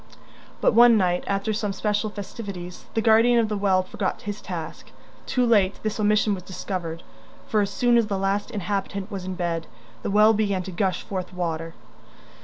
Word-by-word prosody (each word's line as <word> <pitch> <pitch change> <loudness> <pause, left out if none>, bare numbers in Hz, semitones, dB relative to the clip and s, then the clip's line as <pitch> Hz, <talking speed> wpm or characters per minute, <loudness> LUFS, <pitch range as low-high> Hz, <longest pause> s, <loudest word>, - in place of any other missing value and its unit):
But - - +4
one 235 0 +7
night, 180 -3 +1
after 200 +2 0
some 210 -1 -2
special 210 +1 -1
festivities, 200 -3 -7
the 225 - +1
guardian 230 +2 +5
of 225 -2 +2
the 210 - -1
well 195 -2 +2
forgot 185 - -3
his 205 -2 -5
task. 170 -4 -7 0.4
Too 250 -1 +2
late 205 -5 +3
this 215 0 -2
omission 210 0 +3
was 190 - -4
discovered, 180 -3 -5 0.4
for 215 - +2
as 200 - 0
soon 240 +4 +3
as 230 -2 +2
the 200 - -1
last 195 +3 -1
inhabitant 200 -1 -3
was 190 -2 -5
in 185 0 -4
bed, 170 -2 -2 0.3
the - - -3
well 210 +2 +6
began 200 -3 0
to 190 - -7
gush 185 +1 -1
forth 185 -2 -5
water. 165 -2 -3
200 Hz, 185 wpm, -24 LUFS, 185-215 Hz, 0.4 s, one